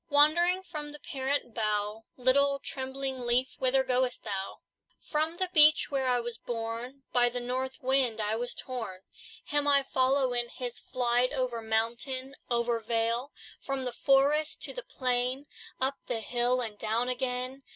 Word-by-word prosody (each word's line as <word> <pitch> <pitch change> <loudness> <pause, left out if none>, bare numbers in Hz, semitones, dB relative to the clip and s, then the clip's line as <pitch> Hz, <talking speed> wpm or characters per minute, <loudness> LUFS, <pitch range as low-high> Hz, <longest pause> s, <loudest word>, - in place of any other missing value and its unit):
Wandering 345 +6 +4
from 305 -5 -5
the 295 - -8
parent 270 -3 -1
bough, 215 0 -1
Little, 275 +2 +3
trembling 265 -1 -3
leaf, 250 +1 +1
Whither 265 +1 +3
goest 255 -1 0
thou? 195 -1 -4 0.4
"From 315 +2 -1
the 370 -1 -1
beech, 305 -2 +6
where 270 -2 0
I 250 -1 +3
was 240 0 -5
born, 235 +3 -5
By 245 -1 +5
the 245 +1 -3
north 255 +2 -3
wind 260 -3 +2
was 220 +3 -1
I - - -3
torn. 230 -8 -5 0.4
Him 290 0 +1
I 280 -1 +5
follow 260 0 +2
in 240 -1 0
his 245 -1 -4
flight, 245 0 +1
Over 250 -3 -1
mountain, 235 +5 -2
over 235 -1 +1
vale, 230 +3 0 0.3
From 275 -1 -3
the 250 - -2
forest 285 +3 +3
to - - -4
the - - -5
plain, 255 - -1 0.3
Up 270 +1 0
the 240 -2 -1
hill, 245 +3 +1
and 220 -3 -6
down 225 +3 0
again. 250 +1 -2
255 Hz, 160 wpm, -29 LUFS, 240-275 Hz, 0.4 s, beech